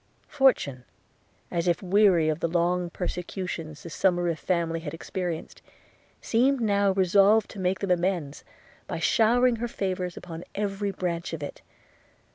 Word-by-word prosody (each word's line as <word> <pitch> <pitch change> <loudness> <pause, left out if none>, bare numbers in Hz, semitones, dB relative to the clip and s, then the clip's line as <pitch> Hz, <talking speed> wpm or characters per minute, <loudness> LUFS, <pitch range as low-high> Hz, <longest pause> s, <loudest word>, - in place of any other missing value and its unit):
Fortune, 255 - +2 0.7
as 170 0 -1
if 175 +3 +1
weary 185 -4 +4
of 155 0 0
the 170 - 0
long 175 +1 0
persecutions 175 -3 -5
the 170 - -7
Somerive 175 -1 +1
family 170 -2 -1
had 160 -1 -6
experienced, 175 -1 -5 0.6
seemed 260 +4 +2
now 200 -3 +2
resolved 195 +3 +4
to 205 - -9
make 185 0 0
them 195 -2 -1
amends 175 -5 -1 0.4
by - - -3
showering 235 +9 +3
her 240 +2 -2
favours 185 -5 -3
upon 170 -1 -8
every 200 0 -2
branch 175 -3 -3
of 155 -3 -4
it. 145 - -7
180 Hz, 140 wpm, -26 LUFS, 170-200 Hz, 0.7 s, weary